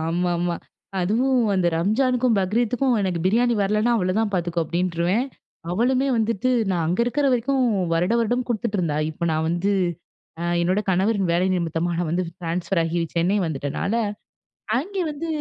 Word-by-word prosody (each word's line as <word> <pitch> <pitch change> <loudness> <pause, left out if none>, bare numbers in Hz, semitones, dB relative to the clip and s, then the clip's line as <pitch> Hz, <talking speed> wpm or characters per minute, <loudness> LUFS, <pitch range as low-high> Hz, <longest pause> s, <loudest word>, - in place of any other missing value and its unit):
ஆமாமா. 175 +1 0 0.5
அதுவும் 245 +8 +2 0.2
அந்த 185 -2 +2
"ரம்ஜானுக்கும், 245 +4 +2
பக்ரீத்துக்கும் 240 +6 +1
எனக்கு 185 -3 -1
பிரியாணி 235 +4 +3
வரலன்னா 215 +4 +2
அவ்ளதான் 205 +3 0
பார்த்துக்கோ!" 170 -1 -1
அப்பிடின்ருவேன். 180 - 0 0.4
அவளுமே 255 +7 +1
வந்துட்டு 230 +1 0 0.2
நான் 170 -3 0
அங்க 180 +6 0
இருக்கிற 275 +4 0
வரைக்கும், 260 +2 +1 0.3
வருட 175 +6 +1
வருடம் 245 +2 0
குடுத்துட்டுருந்தா! 200 -9 -1
இப்ப 170 +2 -3
நான் 160 +1 0
வந்து 175 +4 0 0.7
அ - - -3 0.2
என்னோட 185 +4 +1
கணவரின் 190 0 +1
வேலை 175 +2 +2
நிமித்தமா 170 -1 -1
நான் 175 -3 -1
வந்து 180 +2 0 0.2
ட்ரான்ஸ்ஃபர் 170 +1 -1
ஆகி 165 +1 -1 0.2
சென்னை 175 +5 +2
வந்துட்டனால, 150 +6 -2 0.8
அங்கே 380 +7 -2
வந்து 300 +3 -5
190 Hz, 140 wpm, -23 LUFS, 170-235 Hz, 0.8 s, பிரியாணி